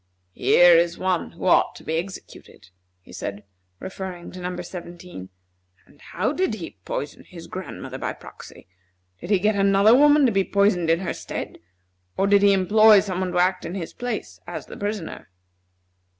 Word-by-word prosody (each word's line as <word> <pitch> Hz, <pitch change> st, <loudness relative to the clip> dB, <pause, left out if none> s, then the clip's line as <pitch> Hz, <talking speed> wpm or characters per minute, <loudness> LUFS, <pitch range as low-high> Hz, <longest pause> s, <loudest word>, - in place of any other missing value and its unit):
"Here 175 Hz, -, +5 dB
is 170 Hz, +1 st, +2 dB
one 185 Hz, -3 st, -2 dB
who 170 Hz, -, -8 dB
ought 180 Hz, -, +3 dB
to -, -, -13 dB
be 160 Hz, -, -2 dB
executed," 175 Hz, -, -9 dB, 0.3 s
he -, -, -16 dB
said, 100 Hz, +1 st, -6 dB, 0.4 s
referring 185 Hz, -2 st, -7 dB
to 185 Hz, -, -10 dB
Number 180 Hz, 0 st, -5 dB
Seventeen. 175 Hz, -, -9 dB, 0.6 s
"And 145 Hz, -, -24 dB
how 210 Hz, -, -2 dB
did 365 Hz, -9 st, -1 dB
he 170 Hz, -6 st, -9 dB
poison 145 Hz, -, -5 dB
his 170 Hz, -2 st, -12 dB
grandmother 185 Hz, +2 st, -7 dB
by -, -, -3 dB
proxy? -, -, -14 dB, 0.5 s
Did 175 Hz, -, -9 dB
he 205 Hz, -, +4 dB
get 210 Hz, +4 st, +1 dB
another 200 Hz, +2 st, +4 dB
woman 295 Hz, +1 st, +5 dB
to 245 Hz, -, +3 dB
be 195 Hz, -2 st, +2 dB
poisoned 200 Hz, -4 st, +1 dB
in 165 Hz, +2 st, +2 dB
her 185 Hz, -, -3 dB
stead? -, -, -7 dB, 0.6 s
Or 195 Hz, -, +2 dB
did 200 Hz, 0 st, +4 dB
he 200 Hz, 0 st, +5 dB
employ 205 Hz, +2 st, +5 dB
some 185 Hz, -3 st, -4 dB
one 185 Hz, -1 st, -2 dB
to -, -, -2 dB
act 185 Hz, +1 st, +2 dB
in 170 Hz, +3 st, -6 dB
his 175 Hz, -4 st, -6 dB
place 245 Hz, 0 st, -5 dB
as -, -, -6 dB
the -, -, -11 dB
poisoner?" 205 Hz, -4 st, -5 dB
185 Hz, 180 wpm, -23 LUFS, 175-200 Hz, 0.6 s, Here